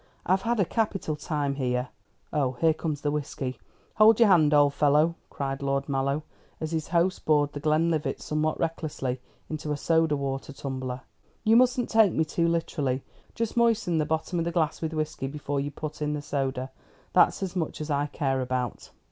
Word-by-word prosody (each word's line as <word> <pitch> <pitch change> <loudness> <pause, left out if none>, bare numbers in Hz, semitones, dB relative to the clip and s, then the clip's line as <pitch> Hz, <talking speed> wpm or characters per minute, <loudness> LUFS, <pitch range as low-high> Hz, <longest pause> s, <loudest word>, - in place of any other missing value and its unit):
I've 190 +1 +2
had 235 0 0
a 195 - +4
capital 195 -6 -1
time 145 -2 -2
here 125 -1 -1 0.4
Oh, 135 -4 +1
here 160 +5 +3
comes 155 -2 -3
the 145 - 0
whisky. 140 -3 -3 0.4
Hold 220 +1 +7
your 230 -3 +6
hand, 160 -5 +5
old 145 -1 +5
fellow!" 150 +3 +3 0.2
cried 135 -1 -4
Lord 140 0 -1
Mallow, 140 +2 0 0.4
as 155 0 -4
his 160 -2 -2
host 175 +2 +1
poured 145 -2 +2
the 145 - -4
Glenlivat 155 +1 +1
somewhat 155 +1 -1
recklessly 150 -6 -2 0.3
into 155 -1 -4
a 145 - -1
soda 160 -1 +2
water 135 0 -4
tumbler. 130 -2 -5 0.4
"You 220 0 +5
mustn't 250 0 +4
take 220 -5 +5
me 160 - +1
too 170 +2 0
literally. 145 -6 -1 0.3
Just 230 -2 -2
moisten 230 -8 +2
the 155 - +1
bottom 160 +3 -1
of 165 - 0
the 170 - -1
glass 165 -2 0
with 160 -1 -2
whisky 155 -3 -2
before 145 0 -3
you 140 +1 -2
put 150 +1 -7
in 150 0 0
the 150 -1 -4
soda. 135 -3 -2 0.4
That's - - +4
as 190 -1 -4
much 165 -4 -2
as 155 0 -4
I 145 0 +1
care 135 -3 -1
about." 125 -2 -3
150 Hz, 190 wpm, -27 LUFS, 140-170 Hz, 0.4 s, Hold